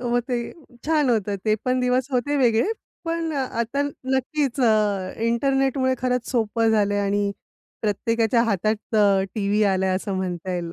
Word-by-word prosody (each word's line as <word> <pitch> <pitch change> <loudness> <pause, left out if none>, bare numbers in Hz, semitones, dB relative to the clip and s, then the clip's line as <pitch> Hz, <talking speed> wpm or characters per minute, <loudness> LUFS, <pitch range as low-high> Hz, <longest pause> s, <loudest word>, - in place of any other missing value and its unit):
हो, 245 0 +1
ते 240 -1 -3 0.3
छान 300 -5 +2
होतं. 205 -3 0
ते 215 - +3
पण 255 0 +1
दिवस 250 +2 +1
होते 265 +3 0
वेगळे. 245 - +3 0.3
पण 330 -1 -2
आता 260 0 -1
नक्कीच 275 0 -2
अ, 210 -5 +2
इंटरनेटमुळे 265 +2 +1
खरंच 250 -1 -1
सोपं 230 -2 +1
झालंय 205 -2 +2
आणि 200 0 0 0.5
प्रत्येकाच्या 230 +2 +1
हातात 215 +1 -1
अ, 200 -2 +4
टीव्ही 205 -1 +1
आलाय 190 0 +1
असं 195 +1 -4
म्हणता 185 -1 -3
येईल. 170 -1 -4
230 Hz, 145 wpm, -23 LUFS, 205-260 Hz, 0.5 s, अ